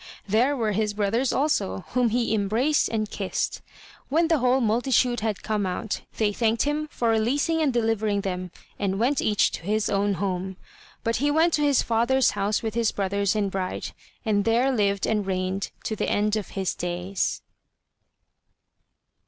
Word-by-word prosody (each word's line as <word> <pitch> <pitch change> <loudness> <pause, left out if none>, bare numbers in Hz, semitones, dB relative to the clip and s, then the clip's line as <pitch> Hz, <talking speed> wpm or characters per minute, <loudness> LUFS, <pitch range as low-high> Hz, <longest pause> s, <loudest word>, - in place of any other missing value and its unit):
there 245 +8 +2
were 220 -3 0
his 210 0 -1
brothers 220 +5 +1
also, 180 - 0
whom 250 -2 +2
he 235 0 0
embraced 220 +9 +1
and 215 -2 -2
kissed. 195 -2 -2 0.5
When 325 +4 +2
the 325 -3 +3
whole 255 +1 +3
multitude 240 +1 +2
had 215 -2 -3
come 215 -1 -1
out, 185 +3 -3 0.2
they 210 -2 +1
thanked 225 +1 +1
him 300 +1 -1
for 235 -5 -1
releasing 275 +9 +1
and 295 -3 +2
delivering 220 -3 0
them, 185 -2 -4 0.3
and 195 -1 0
went 255 +4 +2
each 210 -2 +2
to - - -6
his 210 +4 0
own 200 0 +1
home. 190 -1 -3 0.5
But 230 0 0
he 290 +4 +1
went 320 +3 +3
to 300 - +2
his 285 -2 +3
father's 235 +3 +2
house 205 +2 -1
with 220 -1 -2
his 230 -1 +1
brothers 200 0 0
and 200 -2 0
bride, 185 -1 -3 0.3
and 205 -2 +2
there 235 +5 +2
lived 200 -5 +1
and 210 -2 0
reigned 190 0 -2
to 220 - -2
the - - -1
end 210 +1 +1
of 210 -4 -3
his 190 -2 0
days. 175 +2 -2
220 Hz, 170 wpm, -25 LUFS, 200-245 Hz, 0.5 s, the